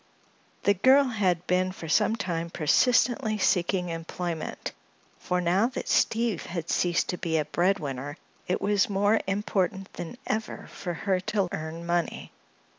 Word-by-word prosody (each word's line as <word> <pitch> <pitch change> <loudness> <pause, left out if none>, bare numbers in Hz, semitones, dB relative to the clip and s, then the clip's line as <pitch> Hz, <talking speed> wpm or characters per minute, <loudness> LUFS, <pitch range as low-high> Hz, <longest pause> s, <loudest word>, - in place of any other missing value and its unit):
The 200 - +5
girl 260 +9 +5
had 190 -9 0
been 185 +1 +1
for 170 -3 -8
some 210 +7 +3
time 170 -5 -3
persistently 220 - +2
seeking 180 -1 +1
employment, 165 0 -4 0.5
for 180 - -1
now 180 +6 +2
that 250 - -5
Steve 225 -5 +1
had 170 -2 -4
ceased 175 -1 +1
to 180 - -2
be 160 -1 0
a 155 - 0
breadwinner 150 -5 -1 0.3
it 180 - 0
was 200 0 +2
more 205 +2 +3
important 195 -1 -1
than 175 +8 -7
ever 220 0 -3
for 175 -3 -4
her 190 +2 0
to 190 0 -1
earn 160 +2 -5
money. 170 0 -1
185 Hz, 145 wpm, -27 LUFS, 170-205 Hz, 0.5 s, The